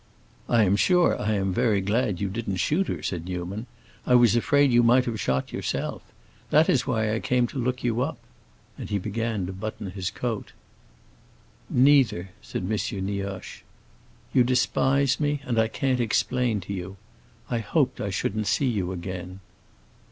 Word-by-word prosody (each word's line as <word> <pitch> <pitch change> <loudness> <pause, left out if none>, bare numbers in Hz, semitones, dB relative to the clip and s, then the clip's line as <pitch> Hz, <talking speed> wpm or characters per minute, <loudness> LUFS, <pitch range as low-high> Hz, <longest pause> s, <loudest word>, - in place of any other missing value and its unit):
"I 115 -2 +4
am 100 0 +3
sure 180 - +3
I 110 +1 0
am 95 -1 0
very 110 -2 +2
glad 105 0 0
you 100 - -1
didn't 100 0 -3
shoot 155 - +1
her," - - -4
said 85 -3 -3
Newman. 95 +5 -5 0.4
"I 125 - +3
was 120 -2 +5
afraid 140 +3 +3
you 120 0 +5
might 125 +2 +4
have 115 -3 -3
shot 65 0 -1
yourself. - - -3 0.5
That 155 +2 +5
is 130 - +2
why 110 -3 0
I 110 - 0
came 125 0 +1
to 135 - -5
look 125 +1 -2
you 120 0 0
up." 140 +5 -2 0.6
And - - -6
he 105 - 0
began 110 0 -2
to 95 - -5
button 100 0 -6
his 95 0 -3
coat. 110 +2 -4 1.2
"Neither," 125 -9 +3
said - - -5
M. 90 - -3 0.4
Nioche. 100 -1 -5 0.7
"You 125 - +5
despise 130 +1 +2
me, 145 -1 0
and 120 -4 0
I 110 - +3
can't 130 +2 -1
explain 120 -1 +1
to 100 - -6
you. 95 +1 -6 0.5
I 120 - +1
hoped 130 +4 0
I 100 - -2
shouldn't 105 +2 -2
see 140 - +2
you 100 -8 -1
again." 90 +1 -6
110 Hz, 170 wpm, -25 LUFS, 95-125 Hz, 1.2 s, was